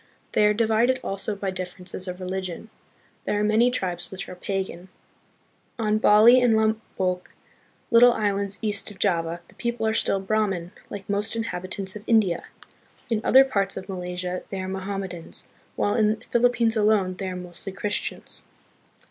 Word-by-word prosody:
They 210 - +4
are 210 - +3
divided 230 +3 +2
also 195 +2 -2
by 195 -1 -3
differ 180 0 -6
ences 185 +1 -3
of 180 0 -5
religion. 185 +3 -5 0.5
There 205 - 0
are - - +1
many 220 +3 +4
tribes 180 -8 -3
which 190 0 -5
are - - -7
pagan. 190 -1 -4 0.9
On. 215 -2 +1
Bali 225 +4 +7
and 240 -3 +4
Lombok, 215 -4 -1 0.6
little 240 +1 +8
islands 200 -2 -1
east 205 -1 0
of 205 - -11
Java, 170 -4 0
the - - -17
people 235 -2 -2
are 220 - +2
still 195 - +2
Brahmin, 195 -3 -1 0.2
like 200 -2 -7
most 205 +3 0
inhabitants 190 -3 -3
of 210 - -7
India. 205 -7 +3 0.7
In 220 -1 +1
other 265 +1 +7
parts 200 -7 -1
of 190 - -6
Malaysia 180 -1 -4
they 195 - -4
are 185 - -4
Mohammedans, 190 -2 -4 0.3
while 205 - +1
in 220 -2 +3
the - - -17
Philippines 235 -1 +3
alone 210 -3 +3
they 190 -1 -3
are 185 - -5
mostly 180 +2 -7
Christians. 205 +2 -3
200 Hz, 165 wpm, -25 LUFS, 185-220 Hz, 0.9 s, little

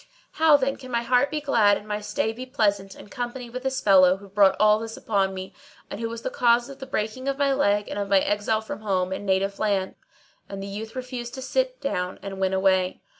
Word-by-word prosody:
How 315 -2 +5
then 270 0 -1
can 255 -1 -11
my 235 -1 -1
heart 250 +3 +3
be 305 - -2
glad 230 -8 +3
and 210 - -12
my 210 0 -3
stay 210 +1 -1
be 255 +3 -8
pleasant 200 -7 0
in - - -13
company 245 +1 -5
with 255 +1 -5
this 265 0 -2
fellow 185 -2 +5
who 200 +1 -14
brought 200 -1 +4
all 215 0 +5
this 225 0 -7
upon 195 -3 0
me, 190 0 -7 0.4
and - - -5
who 230 0 -3
was 230 0 -7
the - - -3
cause 240 0 +2
of 275 -1 -10
the 265 - -8
breaking 255 +1 -3
of 275 0 -1
my 280 -1 +2
leg 205 -7 +1
and - - -4
of 200 -1 -3
my 195 -1 +5
exile 205 +3 0
from 220 -2 -7
home 190 -3 -1
and 200 +1 -6
native 195 +1 0
land. 200 -3 0 0.6
And 195 0 -6
the - - -5
youth 215 +4 -7
refused 250 -2 -6
to 260 - -7
sit - - -1
down 180 -9 -3
and 195 -1 -6
went 190 0 +1
away. 190 -1 +1
215 Hz, 240 wpm, -25 LUFS, 195-255 Hz, 0.6 s, How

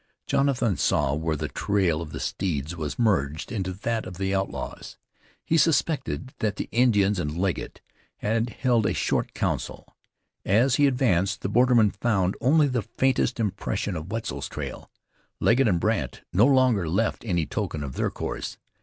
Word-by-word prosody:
Jonathan 130 -7 +1
saw 70 -2 +1
where 80 +1 -1
the 75 +1 -3
trail 90 -1 0
of 80 - -6
the - - -6
steeds 80 -3 -2
was 75 -3 -4
merged 80 - 0
into 95 -5 -2
that 110 +4 -3
of 90 -2 -8
the 95 0 -1
outlaws. 95 0 -4 0.5
He 165 - +2
suspected 145 -4 +1
that 105 -2 0
the - - -4
Indians 105 -5 +3
and 75 -1 -3
Legget 95 0 -2 0.4
had 115 +2 0
held 120 -3 +1
a - - 0
short - - -1
council. - - -3 0.5
As 125 +6 +3
he 145 - +5
advanced 100 -8 +1
the - - -2
borderman 120 -2 +4
found 100 -5 0
only 145 +4 +4
the 125 -3 0
faintest 125 +2 0
impression 100 -2 -2
of 80 +3 -6
Wetzel's 115 0 -4
trail. - - -6 0.5
Legget 120 +2 +4
and 90 -5 +2
Brandt - - -1
no 105 +7 +5
longer 130 - +3
left 110 +7 0
any 85 -8 0
token 75 0 -3
of 70 -2 -5
their - - 0
course. - - -5
105 Hz, 165 wpm, -25 LUFS, 90-125 Hz, 0.5 s, he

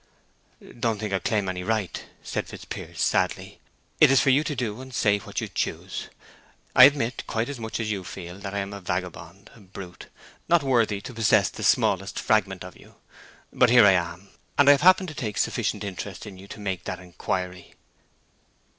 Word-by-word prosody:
"Don't 115 -2 0
think 105 -1 -4
I 95 - +1
claim 105 -1 0
any 90 -1 -3
right," 105 -2 -2 0.2
said - - -3
Fitzpiers, - - -8
sadly. - - 0 0.4
"It - - +8
is 135 -1 +5
for 135 - +4
you 140 +4 +4
to 150 - -2
do 120 -2 -3
and 130 0 -10
say 105 -1 +2
what - - -5
you - - -3
choose. - - -4 0.7
I 130 - +11
admit, 140 -4 +1
quite 115 +3 -1
as 140 -3 -6
much 110 0 -4
as 110 -1 -2
you 100 -3 -3
feel, 90 0 -8
that 100 0 -6
I - - -1
am 100 0 -3
a 100 - -8
vagabond—a 90 +3 -6
brute—not 95 - -4
worthy 115 -6 +1
to 125 - -8
possess 105 -4 +3
the - - -9
smallest - - +2
fragment - - +1
of - - -10
you. - - -18 0.6
But 125 - +4
here 120 -2 +7
I 100 - +8
am, 90 +1 -2 0.3
and 145 0 +6
I - - +11
have 140 - +4
happened 185 0 +5
to - - -8
take 110 -7 -4
sufficient 105 -2 -1
interest 95 0 -6
in 95 -3 -10
you 95 - -12
to 105 - -10
make 95 -3 -4
that 90 - -4
inquiry." 90 0 -5
105 Hz, 190 wpm, -25 LUFS, 95-120 Hz, 0.7 s, I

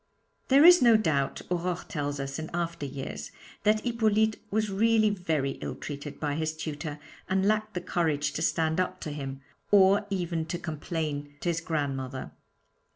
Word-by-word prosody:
There 275 +3 +6
is 355 0 +9
no 235 -3 +7
doubt, 145 -10 0
Aurore 180 0 -1
tells 145 -2 -3
us 135 +2 -4
in 160 - -5
after 170 -4 -2
years, 130 - -6 0.3
that 215 +1 +3
Hippolyte 220 -2 +2
was 215 0 0
really 215 +1 +3
very 160 -8 -1
ill - - -4
treated 145 0 -7
by 145 -2 -1
his 155 +1 -2
tutor, 150 -1 -5 0.3
and 190 0 +2
lacked 215 0 0
the 180 - -1
courage 155 -5 0
to - - -3
stand 160 0 +1
up 185 0 -1
to 155 - -4
him, 135 -2 -6 0.3
or 200 0 +5
even 175 -4 -2
to 175 - -2
complain 150 -3 -4
to 175 - 0
his 170 0 0
grandmother. 135 -5 -3
165 Hz, 165 wpm, -28 LUFS, 145-205 Hz, 0.3 s, is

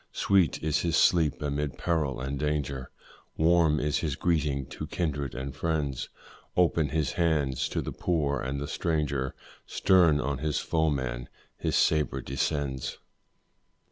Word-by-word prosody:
Sweet 95 -8 +2
is 75 -1 +1
his 85 -1 +1
sleep 80 -4 +3
amid 75 0 -2
peril 75 -7 0
and 70 +1 -3
danger, 70 -3 -2 0.5
Warm 80 -2 +4
is 75 0 0
his 75 -5 -2
greeting 75 -5 0
to - - -6
kindred 70 -6 -2
and 65 +1 -5
friends, 75 -5 -2 0.5
Open 80 -4 +3
his 75 -1 0
hand 75 -6 +1
to - - -1
the - - -4
poor 75 -6 0
and 65 +3 -3
the 70 - -4
stranger, 70 -6 -1 0.3
Stern 85 -6 +4
on 70 -1 -2
his 75 0 -1
foeman 65 -7 -1 0.3
his - - -1
sabre 75 -3 +2
descends. 70 0 -2
75 Hz, 140 wpm, -28 LUFS, 70-80 Hz, 0.5 s, Warm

